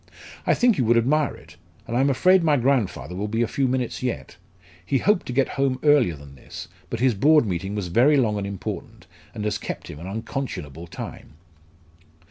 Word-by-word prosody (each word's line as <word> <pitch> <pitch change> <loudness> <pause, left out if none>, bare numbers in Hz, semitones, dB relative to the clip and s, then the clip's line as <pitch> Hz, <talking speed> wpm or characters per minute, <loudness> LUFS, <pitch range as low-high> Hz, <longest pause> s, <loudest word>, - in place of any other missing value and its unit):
"I - - +4
think 240 - +3
you 125 - +2
would 120 +1 +4
admire 140 +5 +2
it, - - -16 0.3
and 115 - -4
I - - +2
am 140 - +3
afraid 185 +7 +4
my 150 -3 +3
grandfather 120 - 0
will 100 +3 -2
be 115 +3 0
a - - 0
few 135 +3 0
minutes 125 -1 -2
yet. 125 -2 -4 0.5
He 135 +10 +1
hoped 205 - +1
to - - -3
get 130 +2 +1
home 135 -2 +2
earlier 145 - +4
than 70 -1 -13
this, 65 - -10 0.2
but 115 - -4
his 130 -2 +4
Board 150 +7 +4
meeting 95 +1 -3
was 100 -4 -3
very 130 - +4
long 110 -6 +1
and 100 - -3
important, 100 -2 -6 0.3
and 105 - -4
has 105 - -1
kept - - -6
him 75 - -10
an 85 - -8
unconscionable 95 - -5
time." - - -8
120 Hz, 205 wpm, -24 LUFS, 100-140 Hz, 0.5 s, I